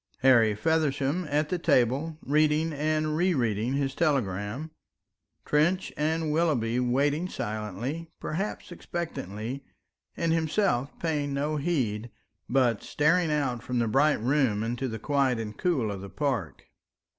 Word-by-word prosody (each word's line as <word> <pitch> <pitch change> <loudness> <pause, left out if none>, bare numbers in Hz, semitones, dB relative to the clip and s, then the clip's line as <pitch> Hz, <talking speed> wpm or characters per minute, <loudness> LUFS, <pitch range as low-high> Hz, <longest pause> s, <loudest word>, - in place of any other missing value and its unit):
Harry 115 -5 +5
Feversham 155 - 0
at 150 +1 +1
the 180 - -1
table 145 0 +2
reading 155 +2 +2
and 155 +1 0
re 175 +2 +2
reading 115 -1 0
his 140 -1 0
telegram, 135 - -1 0.7
Trench 170 +6 +1
and 155 +1 0
Willoughby 140 -8 +1
waiting 140 +7 +1
silently, 110 - -4
perhaps 190 +3 -4
expectantly, 135 - -5 0.5
and 165 -1 +1
himself 160 - 0
paying 145 -4 -1
no 150 +2 -1
heed, 125 -8 -1 0.4
but 120 -4 +2
staring 165 +2 +2
out 135 -6 0
from 125 +2 -3
the 115 -1 +2
bright 145 +7 +3
room 125 -3 +1
into 120 +3 -2
the 110 -2 -4
quiet 135 +1 +1
and 110 -1 -5
cool 140 - +1
of 100 -2 -6
the 100 - -8
park. 140 -2 -2
140 Hz, 135 wpm, -28 LUFS, 120-155 Hz, 0.7 s, Harry